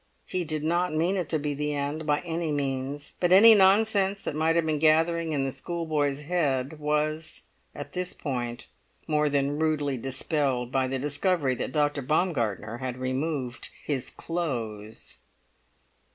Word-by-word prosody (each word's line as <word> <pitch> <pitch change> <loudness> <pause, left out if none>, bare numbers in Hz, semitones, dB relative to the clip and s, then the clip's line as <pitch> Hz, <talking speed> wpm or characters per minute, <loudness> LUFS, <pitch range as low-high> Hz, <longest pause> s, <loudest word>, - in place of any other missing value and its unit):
He 185 - -2
did 155 -2 -3
not 170 +1 +1
mean 170 +5 +2
it 180 -5 -2
to 160 - +2
be 145 -1 -2
the 150 +1 -2
end, 145 +2 -3
by 145 0 +2
any 165 -2 -2
means; 140 0 -3
but 175 -1 +1
any 220 +5 +9
nonsense 200 0 +4
that - - -3
might 160 +2 +1
have 170 -1 +2
been 155 -2 0
gathering 165 +1 +3
in 140 -3 0
the 135 - -1
schoolboy's 150 -1 -2
head 145 -3 -1
was, 150 +1 -1 0.3
at 145 - -8
this 180 0 -1
point, 120 -4 -4 0.4
more 150 -1 +2
than 140 +1 0
rudely 150 -4 0
dispelled 130 0 -1
by 130 -1 +1
the 135 +1 -2
discovery 145 +1 0
that 125 - -4
Dr. 145 0 +1
Baumgartner 120 - -1
had 130 -1 -4
removed 130 -1 -3
his 135 -4 -2
clothes! 115 -11 -4
150 Hz, 155 wpm, -27 LUFS, 135-165 Hz, 0.4 s, any